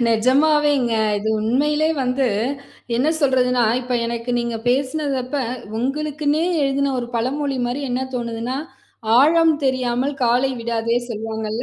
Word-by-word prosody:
நிஜமாவேங்க. 270 +2 +3 0.3
இது 215 +2 -3
உண்மையிலே 295 +8 +1
வந்து 255 +1 0 0.7
என்ன 265 +5 +2
சொல்றதுன்னா, 250 -3 +2 0.2
இப்ப 250 0 -5
எனக்கு 235 +1 -4
நீங்க 235 -1 -2
பேசினது 275 +3 0
அப்ப 270 +3 -4 0.4
உங்களுக்குன்னே 300 +4 -1 0.2
எழுதின 275 0 +1
ஒரு 240 - -3
பழமொழி 270 +4 -1
மாரி 245 +4 -3
என்ன 250 +1 -1
தோணுதுன்னா 235 +1 -3 0.6
"ஆழம் 320 +3 +5
தெரியாமல் 260 +1 0
காலை 245 +3 +2
விடாதே" 230 0 -1
சொல்வாங்கல்ல 220 0 -4
255 Hz, 120 wpm, -21 LUFS, 235-285 Hz, 0.7 s, ஆழம்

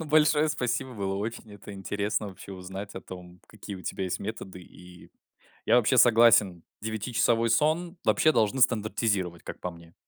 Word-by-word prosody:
Ну, 160 - -5
большое 150 0 +3
спасибо, 130 -2 -2
было 95 -2 -3
очень 110 +1 -5
это 100 0 -11
интересно 105 +2 -3
вообще 95 0 -11
узнать 95 +2 -8
о 95 - -6
том, 90 -1 -12
какие 105 -1 -9
у 90 - -11
тебя 95 - -4
есть 90 - -3
методы, 100 -3 -7
и 90 0 -15 0.6
я - - +4
вообще 125 +2 +3
согласен: 110 -7 +5 0.2
девятичасовой 115 +1 0
сон 160 - +1
вообще 155 - +3
должны 115 0 +1
стандартизировать, 105 -7 0
как - - -8
по 90 - -4
мне. 85 0 -16
105 Hz, 165 wpm, -27 LUFS, 95-120 Hz, 0.6 s, согласен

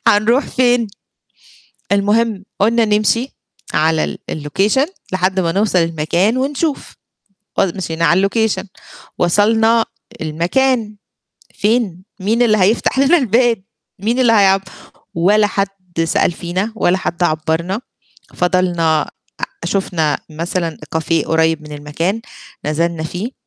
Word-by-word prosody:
هنروح 230 +7 +3
فين؟ 245 -2 +2 1.1
المهم 205 +1 +1 0.2
قُلنا 230 +3 +3
نمشي 215 +4 +1 0.4
على 160 +1 +2
ال - - -4
الlocation 195 - 0 0.2
لحد 185 +1 +1
ما 170 -3 +1
نوصل 200 0 +2
المكان 165 +7 +1
ونشوف، 280 +3 -2 0.7
مشينا 170 -3 0
على 190 +4 +3
الlocation 220 -3 0 0.5
وصلنا 220 +5 +3 0.4
المكان 210 - 0 0.6
فين؟ 205 -5 0 0.2
مين 220 +5 +1
اللي 220 -3 +4
هيفتح 210 +6 +2
لنا 275 +5 +5
الباب، 235 -4 +2 0.4
مين 225 +6 -1
اللي 245 -3 +4
هيعب 195 -3 +4 0.5
ولا 205 +5 +3
حد 200 -1 -1 0.4
سأل 165 - +1
فينا، 185 +5 -3
ولا 180 -4 +2
حد 175 -1 -3
عبّرنا. 165 +4 0 0.5
فضلنا 175 -3 +2
أ - - -14 0.4
شُفنا 170 -5 0
مثلًا 165 +1 -3 0.2
cafe 160 0 +1
قريب 160 -1 +1
من 150 0 -11
المكان 150 +8 -2 0.4
نزلنا 160 +2 -1
فيه. 180 +9 -4
190 Hz, 115 wpm, -17 LUFS, 165-225 Hz, 1.1 s, لنا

